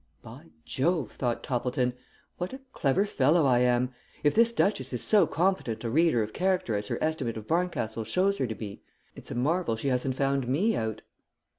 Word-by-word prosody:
"By - - -12 0.2
Jove!" 155 -2 0
thought 120 -3 -2
Toppleton. 125 -1 -1 0.5
"What 180 +6 -3
a 265 - -8
clever 145 +8 +2
fellow 155 -3 +3
I 125 -2 +4
am! 125 +1 +2 0.3
If 145 - +4
this 230 +1 +4
duchess 195 - 0
is 125 - -1
so 205 -6 +5
competent 170 - 0
a 115 - -2
reader 155 -5 +3
of 105 - -7
character 185 - 0
as 105 0 -3
her - - -2
estimate 145 -8 -1
of 110 - -7
Barncastle 160 -9 -1
shows 190 - +1
her 130 - +1
to 110 - -4
be, 105 -1 -8 0.3
it's - - -12
a - - -5
marvel 150 +1 +1
she 125 +5 -2
hasn't 130 0 0
found 135 -1 0
me 190 - +2
out." 110 -1 -3
135 Hz, 190 wpm, -28 LUFS, 120-175 Hz, 0.5 s, so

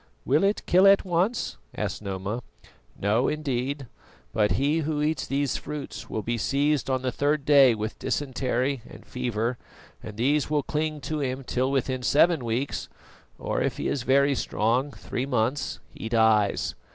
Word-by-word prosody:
"Will - - +3
it 200 +2 +1
kill 185 +2 +5
at 195 0 +6
once?" 180 - 0 0.2
asked - - -3
Noma. 100 +3 -4 0.6
"No, 110 +6 +2
indeed; 140 -2 -2 0.5
but 105 -2 +2
he 145 +4 +1
who 155 -1 -1
eats 155 +1 -1
these 140 -1 0
fruits 150 -2 -7
will 110 - -3
be 120 0 -2
seized 140 +3 +1
on 130 -1 0
the 130 - 0
third 145 +1 0
day 135 -5 +6
with 110 0 -5
dysentery 130 -1 -1
and - - -13
fever, 120 -1 -2 0.4
and 105 -1 -9
these 140 +5 +1
will 150 -2 +1
cling 155 0 -2
to 150 +3 -3
him 130 0 -2
till 130 +1 0
within 130 -1 -1
seven 155 +3 +3
weeks 120 +4 -2 0.5
or - - -2
if - - -1
he - - -2
is 135 - -1
very 140 +3 +3
strong, 125 +3 0
three 130 -1 -4
months 125 +2 -1
he 110 - -7
dies. 110 -3 +3
135 Hz, 165 wpm, -26 LUFS, 120-145 Hz, 0.6 s, at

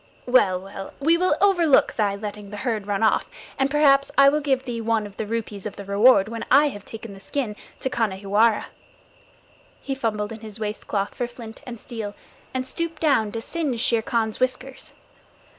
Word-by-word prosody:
Well, 205 -8 +4
well, 195 +1 -9
we 320 +4 +4
will 365 +2 +2
overlook 350 -8 +4
thy 205 -3 0
letting 205 0 -7
the 210 - -7
herd 215 -3 -2
run 205 +1 0
off, 220 - +2 0.3
and 270 0 +2
perhaps 275 -1 +4
I 275 0 +8
will 300 +2 +1
give 270 -3 0
thee 235 -2 -3
one 225 -1 0
of 200 -1 -11
the 220 - -3
rupees 215 -3 -4
of 210 - -8
the 200 - -8
reward 200 +1 +5
when 230 +1 -5
I 290 +3 +6
have 205 -6 -10
taken 225 -2 -9
the 195 - -12
skin 220 +1 -3 0.3
to - - 0
Khanhiwara." 215 -2 +1 1.1
He 275 - -4
fumbled 220 -5 -2
in 225 - -7
his 215 0 -9
waist 210 -1 -4
cloth 200 -1 -1
for 245 - -2
flint 230 -2 -11
and 240 -2 -7
steel, 215 -4 -6 0.4
and 260 0 -2
stooped 330 +3 -4
down 250 -9 +2
to 225 - -3
singe 290 -4 -2
Shere 230 0 +2
Khan's 220 -1 -1
whiskers. 255 +1 -2
230 Hz, 190 wpm, -24 LUFS, 210-265 Hz, 1.1 s, I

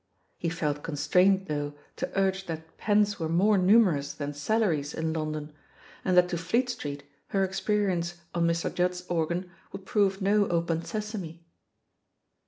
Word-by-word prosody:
He 170 - -1
felt 150 -3 -2
con 160 - -5
strained, 185 +6 +3
though, 145 -3 -3 0.2
to - - -3
urge 190 0 0
that 160 -1 -7
pens 205 -1 +2
were 160 -1 -2
more 195 +6 +4
numerous 180 -8 +4
than 145 0 -4
salaries 155 -3 0
in 160 0 -1
London, 155 -1 -4 0.5
and 185 -1 +2
that 180 0 +7
to 175 -2 -2
Fleet 235 +10 +1
Street 145 -9 -6 0.2
her 195 -1 +1
experience 190 -3 0 0.2
on 170 -1 +2
Mr. 170 0 0
Judd's 180 0 0
organ 175 +2 -1 0.2
would 195 -1 -8
prove 195 -1 +2
no 200 +1 +3
Open 170 -1 0
Sesame. 200 -7 -5
175 Hz, 155 wpm, -28 LUFS, 160-195 Hz, 0.5 s, that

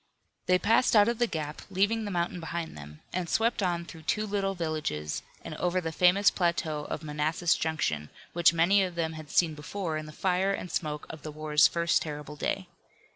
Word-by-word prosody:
They 180 - +5
passed 225 +5 +3
out 205 0 +7
of 235 0 0
the 240 - +3
gap, 150 -5 -4
leaving 205 +4 +1
the - - -3
mountain 175 -1 -1
behind 165 0 -5
them, 75 0 -11
and 180 -2 -2
swept 225 0 +1
on 175 -2 0
through 165 -1 -11
two 215 +7 0
little 195 -1 -1
villages, 155 - -2 0.2
and - - -5
over 180 +1 +1
the 165 -2 -3
famous 180 +5 +5
plateau 160 -4 -1
of 155 - -5
Manassas 155 +3 +1
Junction 80 - -1 0.2
which 170 -1 +5
many 170 +4 +4
of 185 -2 -2
them 160 -1 -1
had 155 -2 -9
seen 165 -3 +3
before 160 +2 -4
in 155 0 -6
the - - -9
fire 190 +4 +1
and 180 - -7
smoke 150 -3 -2
of 155 - -10
the 155 - -6
war's 150 0 +4
first 170 -1 +1
terrible 150 -1 -6
day. 185 +5 -2
170 Hz, 200 wpm, -29 LUFS, 155-185 Hz, 0.2 s, out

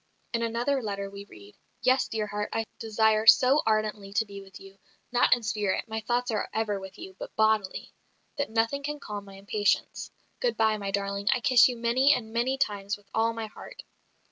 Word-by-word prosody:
In 230 - 0
another 240 +4 0
letter 200 -3 -4
we 200 0 -9
read, 105 - -15 0.3
"Yes, 255 +2 +3
dear 220 -1 -2
heart, 210 0 -4
I 225 0 -1
desire 220 0 +2
so 265 +6 +7
ardently 215 -2 0
to 225 - +1
be 200 -1 -9
with 195 -1 -13
you 195 0 -15 0.3
not 245 0 +3
in 240 - -9
spirit, 210 -1 -1
my 220 0 -3
thoughts 240 +2 -1
are 215 - -2
ever 210 -2 0
with 190 -1 -10
you, 190 - -10
but - - -8
bodily 215 -3 +1 0.4
that 285 -1 -2
nothing 230 +5 0
can 295 +1 -4
calm 205 -5 -7
my 195 -1 -12
impatience. 205 +1 -1 0.3
Good - - 0
bye, 220 -1 +3
my 200 -1 -4
darling. 200 0 -2
I - - +2
kiss 245 0 +6
you 250 -2 -4
many 255 +5 +3
and 220 -2 -6
many 250 +3 0
times 205 -6 -1
with 200 -1 -27
all 225 +1 +2
my 225 -1 -4
heart." 215 - -11
220 Hz, 200 wpm, -27 LUFS, 200-235 Hz, 0.4 s, so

